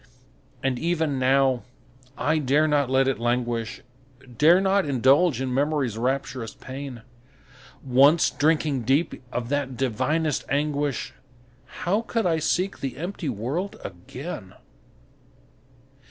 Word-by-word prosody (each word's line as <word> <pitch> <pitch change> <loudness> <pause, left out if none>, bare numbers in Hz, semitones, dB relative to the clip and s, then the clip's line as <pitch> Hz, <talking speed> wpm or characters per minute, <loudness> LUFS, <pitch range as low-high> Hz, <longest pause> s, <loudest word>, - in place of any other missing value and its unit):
And 130 -2 0
even 160 -5 0
now, 130 -1 +3 0.6
I 155 +1 +1
dare 150 +2 +2
not 145 -3 +2
let 130 0 +3
it 135 - 0
languish, 120 -1 -1 0.6
Dare 165 +4 +7
not 195 +1 +2
indulge 140 +2 +3
in 130 -1 -2
Memory's 140 -4 0
rapturous 125 -1 -2
pain; 130 -3 -8 0.8
Once 140 +5 +5
drinking 150 -3 +1
deep 135 +7 0
of 120 -1 -3
that 140 -3 -2
divinest 150 +5 0
anguish, 145 -1 -1 0.7
How 200 +5 +1
could 230 -2 -2
I 165 -2 +2
seek 185 +5 0
the 135 -3 -4
empty 175 0 -4
world 135 - -3
again? 95 - -8
140 Hz, 115 wpm, -25 LUFS, 125-155 Hz, 0.8 s, Dare